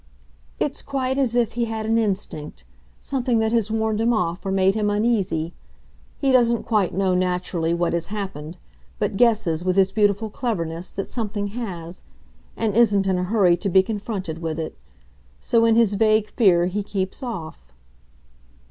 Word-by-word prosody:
"It's -, -, -2 dB
quite 265 Hz, -1 st, -2 dB
as 245 Hz, -4 st, +1 dB
if 240 Hz, -2 st, +2 dB
he 235 Hz, 0 st, -1 dB
had 220 Hz, -1 st, -4 dB
an 225 Hz, +1 st, +2 dB
instinct 190 Hz, -, -3 dB, 0.3 s
something 250 Hz, -3 st, -1 dB
that 220 Hz, 0 st, +1 dB
has 225 Hz, -3 st, +1 dB
warned 220 Hz, 0 st, 0 dB
him 235 Hz, +1 st, +3 dB
off 180 Hz, -4 st, -1 dB
or 195 Hz, -, -2 dB
made 190 Hz, 0 st, +3 dB
him 210 Hz, -1 st, 0 dB
uneasy. 205 Hz, -7 st, 0 dB, 0.6 s
He 275 Hz, -2 st, +1 dB
doesn't 235 Hz, -2 st, +3 dB
quite 210 Hz, -5 st, +1 dB
know, 190 Hz, +1 st, +1 dB
naturally, 180 Hz, -2 st, 0 dB
what 170 Hz, 0 st, 0 dB
has 170 Hz, -1 st, -1 dB
happened, 190 Hz, -6 st, -6 dB, 0.4 s
but -, -, -1 dB
guesses, 200 Hz, -8 st, +2 dB
with 185 Hz, 0 st, +1 dB
his 195 Hz, -1 st, +3 dB
beautiful 210 Hz, +1 st, +1 dB
cleverness, 175 Hz, -8 st, -3 dB
that 195 Hz, -, -5 dB
something 205 Hz, -3 st, -3 dB
has, 185 Hz, -7 st, -6 dB, 0.6 s
and 220 Hz, -3 st, -1 dB
isn't 205 Hz, -4 st, +4 dB
in 190 Hz, -1 st, +1 dB
a 180 Hz, -, -1 dB
hurry 185 Hz, -3 st, +3 dB
to 195 Hz, +3 st, -2 dB
be 190 Hz, +1 st, +5 dB
confronted 200 Hz, -6 st, -4 dB
with 160 Hz, -1 st, -3 dB
it. 160 Hz, -, -5 dB, 0.6 s
So, 230 Hz, -1 st, +2 dB
in 225 Hz, -1 st, +4 dB
his 225 Hz, -3 st, +4 dB
vague 215 Hz, +1 st, +2 dB
fear, 180 Hz, -7 st, +4 dB
he 190 Hz, +3 st, -2 dB
keeps 195 Hz, -2 st, -4 dB
off." 160 Hz, -, -7 dB
205 Hz, 170 wpm, -23 LUFS, 180-225 Hz, 0.6 s, be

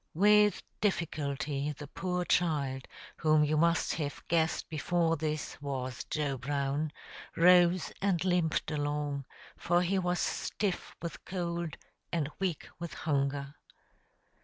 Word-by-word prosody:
With 210 Hz, +3 st, +5 dB, 0.2 s
difficulty 145 Hz, -6 st, -1 dB
the 145 Hz, +1 st, -8 dB
poor 180 Hz, +4 st, -2 dB
child, 145 Hz, -7 st, +1 dB, 0.3 s
whom 155 Hz, -1 st, +4 dB
you 150 Hz, +1 st, +2 dB
must 170 Hz, +2 st, +3 dB
have 145 Hz, -1 st, -4 dB
guessed 165 Hz, -1 st, +1 dB
before 165 Hz, +1 st, +1 dB
this 155 Hz, -1 st, -3 dB
was 130 Hz, -3 st, -4 dB
Joe 145 Hz, -4 st, -1 dB
Brown, 140 Hz, +3 st, -1 dB, 0.4 s
rose 175 Hz, 0 st, +5 dB
and 190 Hz, -3 st, +1 dB
limped 175 Hz, -4 st, +1 dB
along, 145 Hz, -2 st, -1 dB, 0.3 s
for 175 Hz, +1 st, +2 dB
he 190 Hz, +2 st, +1 dB
was 180 Hz, -1 st, 0 dB
stiff 200 Hz, -4 st, -2 dB
with 170 Hz, -2 st, -5 dB
cold 170 Hz, -3 st, -3 dB, 0.3 s
and 155 Hz, -3 st, -1 dB
weak 185 Hz, -5 st, -2 dB
with 170 Hz, -1 st, -5 dB
hunger. 140 Hz, -1 st, -1 dB
155 Hz, 120 wpm, -31 LUFS, 145-175 Hz, 0.4 s, With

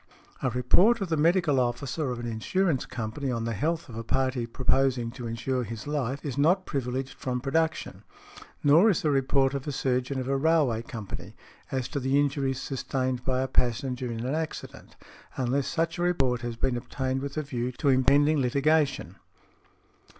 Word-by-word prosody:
A 130 Hz, -, +1 dB
report 175 Hz, -, +4 dB
of 195 Hz, -4 st, -3 dB
the 160 Hz, -, +2 dB
medical 160 Hz, -2 st, +3 dB
officer 130 Hz, +4 st, -1 dB
of 125 Hz, -1 st, -3 dB
an 120 Hz, -, -5 dB
insurance 135 Hz, -, 0 dB
company 120 Hz, +4 st, -4 dB
on 115 Hz, -2 st, -1 dB
the 115 Hz, -, -1 dB
health 160 Hz, +9 st, -1 dB
of 120 Hz, -, -10 dB
a 115 Hz, -, -4 dB
party 130 Hz, 0 st, 0 dB
proposing 130 Hz, -1 st, +1 dB
to 120 Hz, -1 st, -7 dB
insure 125 Hz, +3 st, -2 dB
his 115 Hz, +1 st, -7 dB
life 140 Hz, -2 st, -2 dB
is 140 Hz, -1 st, -3 dB
not 180 Hz, +6 st, +3 dB
privileged 130 Hz, -1 st, -3 dB
from 125 Hz, -1 st, -3 dB
production; 160 Hz, +5 st, -1 dB, 0.6 s
nor 160 Hz, +9 st, +6 dB
is 200 Hz, -1 st, +1 dB
the 150 Hz, -, +2 dB
report 135 Hz, 0 st, +2 dB
of 140 Hz, +1 st, -4 dB
a -, -, -1 dB
surgeon 130 Hz, 0 st, -1 dB
of 130 Hz, -, -3 dB
a 135 Hz, -, +1 dB
railway 140 Hz, -6 st, +2 dB
company, 115 Hz, -6 st, -8 dB, 0.4 s
as 130 Hz, -2 st, -1 dB
to 140 Hz, -, -2 dB
the 135 Hz, +2 st, +2 dB
injuries 140 Hz, -2 st, 0 dB
sustained 130 Hz, -2 st, -2 dB
by 130 Hz, -1 st, 0 dB
a -, -, -1 dB
passenger 125 Hz, 0 st, -1 dB
in 115 Hz, +1 st, -4 dB
an 130 Hz, -, -1 dB
accident, 160 Hz, 0 st, -5 dB, 0.4 s
unless 130 Hz, +2 st, 0 dB
such 165 Hz, +1 st, -1 dB
a -, -, -1 dB
report 135 Hz, -9 st, +1 dB
has 120 Hz, -1 st, -4 dB
been 120 Hz, +2 st, 0 dB
obtained 130 Hz, +2 st, -3 dB
with 140 Hz, +2 st, -5 dB
a 155 Hz, -, 0 dB
view 125 Hz, -3 st, -3 dB
to 140 Hz, -, 0 dB
impending 140 Hz, +3 st, +4 dB
litigation. 140 Hz, -, +1 dB
135 Hz, 180 wpm, -27 LUFS, 125-145 Hz, 0.6 s, nor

